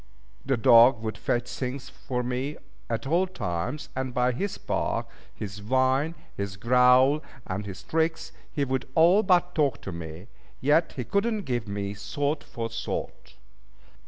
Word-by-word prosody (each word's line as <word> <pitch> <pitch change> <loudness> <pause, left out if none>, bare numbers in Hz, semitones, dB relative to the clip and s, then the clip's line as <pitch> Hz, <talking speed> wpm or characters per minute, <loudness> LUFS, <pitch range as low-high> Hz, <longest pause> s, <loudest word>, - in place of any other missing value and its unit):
The 135 -1 +1
dog 115 +1 +6
would 110 -2 -3
fetch 120 +3 -1
things 130 +1 -5
for 125 -3 -4
me 130 +4 -3 0.3
at 115 +1 -2
all 170 +7 +2
times, 125 - -4
and 130 -1 -3
by 125 0 +3
his 195 +11 -3
bark, - - -2 0.2
his 100 0 -7
whine, 130 +7 +1 0.2
his 100 -1 -4
growl, 125 +6 +5 0.2
and 100 +2 -4
his 95 -1 -8
tricks, 160 0 -1 0.2
he 145 -3 0
would 130 0 -2
all 175 +6 +6
but 180 -3 +3
talk 145 -4 +1
to 100 - -5
me; 85 +1 -7 0.3
yet 150 +5 +3
he 125 - -4
could 200 - 0
not 215 -3 -3
give 120 -4 -2
me 100 0 -3
thought 145 +9 -2
for 115 -1 -5
thought. 115 0 -5
125 Hz, 160 wpm, -27 LUFS, 110-150 Hz, 0.3 s, dog